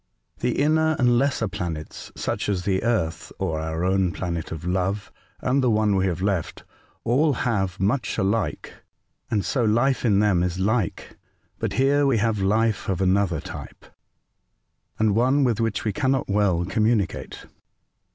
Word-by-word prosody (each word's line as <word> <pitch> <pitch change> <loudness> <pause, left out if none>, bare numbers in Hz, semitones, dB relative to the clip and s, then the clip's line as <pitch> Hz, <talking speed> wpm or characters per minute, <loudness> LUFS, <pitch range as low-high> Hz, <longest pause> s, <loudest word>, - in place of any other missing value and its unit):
The 120 0 -1
inner 155 +2 +3
and 120 -3 +3
lesser 135 -4 0
planets, 80 -5 -6
such - - -2
as 95 -3 -1
the 95 -1 +1
Earth, 90 -9 -1
or 80 -5 -2
our 80 +1 -3
own 95 -1 +2
planet 85 -2 -4
of 80 +1 -6
love, 95 +3 -1 0.3
and 130 +2 +1
the 125 - +3
one 105 -2 +2
we 95 0 +2
have 90 0 -2
left, 95 -5 -2 0.4
all 140 +6 +2
have 100 -7 -1
much 105 +4 0
alike, 95 -6 -1 0.6
and 105 -3 0
so 125 - 0
life 120 +5 +2
in 105 -5 +3
them 105 -4 +3
is 90 0 -1
like; 105 0 -1 0.4
but - - -2
here 140 +2 +3
we 130 -4 +3
have 110 -1 +1
life 105 +2 +1
of 95 - 0
another 95 -3 +2
type, 80 -4 -9 1.1
and 110 -1 +2
one 130 +6 +3
with 120 -4 +1
which 115 -3 -1
we 105 - 0
cannot 135 -2 0
well 100 -4 +1
communi 110 0 +2
cate." - - -9
105 Hz, 160 wpm, -24 LUFS, 90-120 Hz, 1.1 s, inner